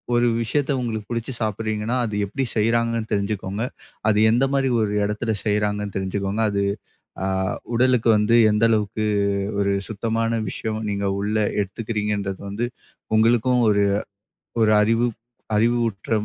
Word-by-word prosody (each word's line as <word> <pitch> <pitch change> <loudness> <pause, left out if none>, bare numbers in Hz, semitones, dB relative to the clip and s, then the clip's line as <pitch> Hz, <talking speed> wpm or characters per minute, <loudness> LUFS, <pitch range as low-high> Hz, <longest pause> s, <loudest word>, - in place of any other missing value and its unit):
ஒரு 120 0 +3
விஷயத்த 140 +5 0
உங்களுக்கு 110 -4 -3
பிடிச்சு 115 +2 -3
சாப்பிடுறீங்கன்னா 110 +1 -2
அது 105 -2 -4
எப்படி 135 +7 -3
செய்றாங்கன்னு 115 0 +1
தெரிஞ்சுக்கோங்க. 100 0 -2 0.4
அது 105 -1 +3
எந்த 120 +4 +3
மாதிரி 135 -1 +2
ஒரு 105 -1 0
இடத்துல 105 +2 -1
செய்றாங்கன்னு 105 -1 0
தெரிஞ்சுக்கோங்க. 95 +2 -2
அது, 100 0 0 0.6
அ - - 0 0.5
உடலுக்கு 125 -1 +3
வந்து 105 +2 +3 0.2
எந்த 105 +2 +3
அளவுக்கு 110 -1 0 0.5
ஒரு 100 0 +2
சுத்தமான 115 +1 -1
விஷயம். 110 +2 -4
நீங்க 100 0 -2
உள்ள 105 +2 -1 0.2
எடுத்துக்குறீங்கன்றது 105 -1 -3
வந்து 110 +5 -2 0.5
உங்களுக்கும் 120 +2 +3
ஒரு 100 -1 +3 0.8
ஒரு 110 -1 +5
அறிவு 115 +3 +2 0.5
அறிவுற்ற 115 -2 0
110 Hz, 125 wpm, -23 LUFS, 105-115 Hz, 0.8 s, ஒரு